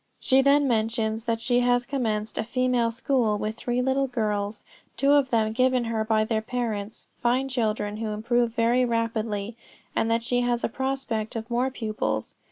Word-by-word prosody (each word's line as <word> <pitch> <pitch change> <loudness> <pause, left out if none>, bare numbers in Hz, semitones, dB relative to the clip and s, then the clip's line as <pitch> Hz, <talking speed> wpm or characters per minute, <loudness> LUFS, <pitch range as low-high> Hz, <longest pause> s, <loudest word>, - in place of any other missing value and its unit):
She 265 0 +4
then 280 +1 +4
mentions 225 -1 0
that 230 -1 0
she 245 +1 +2
has 245 0 +2
commenced 225 -5 -2
a - - +1
female 250 0 +1
school 235 -2 +1
with 215 +1 -3
three 245 +2 -1
little 265 +1 +1
girls, 210 -3 -2 0.3
two 275 +4 +3
of 285 -2 +4
them 220 -2 +2
given 255 +1 +2
her 225 -1 -1
by 215 0 +2
their 220 0 0
parents, 220 -3 -4 0.2
fine 250 +3 +2
children, 215 -4 -1
who 225 0 -3
improve 235 +3 +1
very 240 +2 +3
rapidly, 230 -2 -1 0.4
and 225 - +1
that 230 0 +1
she 245 +1 +1
has 240 -1 0
a - - +1
prospect 265 -4 -3
of 225 +1 -5
more 245 +2 +1
pupils. 220 -5 -3
230 Hz, 175 wpm, -26 LUFS, 220-250 Hz, 0.4 s, She